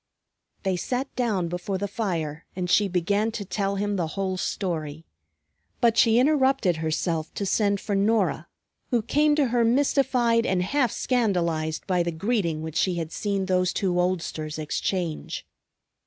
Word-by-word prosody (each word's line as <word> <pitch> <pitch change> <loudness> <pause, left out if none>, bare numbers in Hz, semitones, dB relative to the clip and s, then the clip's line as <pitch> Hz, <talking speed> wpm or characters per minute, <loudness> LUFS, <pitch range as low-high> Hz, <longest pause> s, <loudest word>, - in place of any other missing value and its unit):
They 190 -2 0
sat 255 +8 -3
down 210 -8 0
before 180 +3 -3
the 205 +2 -2
fire 165 -8 -3
and 180 -1 -2
she 205 - +4
began 200 +4 +1
to 205 -3 -4
tell 200 0 -1
him 205 0 -1
the 170 -3 0
whole 190 -1 -1
story. 165 -5 -3 0.7
But 235 -2 +3
she 230 0 +5
interrupted 265 - +3
herself 160 0 -1
to 200 - -2
send 200 0 +1
for 205 - -4
Norah, 195 -6 +1 0.4
who 235 -3 +1
came 295 +5 +3
to 285 -4 +2
her, 240 0 +2
mystified 245 -2 +2
and 180 -3 +1
half 245 +4 +1
scandalized 170 -10 0
by 180 -2 +1
the 170 0 -1
greeting 170 -3 -1
which 160 0 -4
she 185 0 +2
had 165 -2 -4
seen 200 -2 -1
those 185 -1 +2
two 180 -3 0
oldsters 165 -4 -2
exchange. 160 +2 -3
195 Hz, 155 wpm, -25 LUFS, 170-230 Hz, 0.7 s, she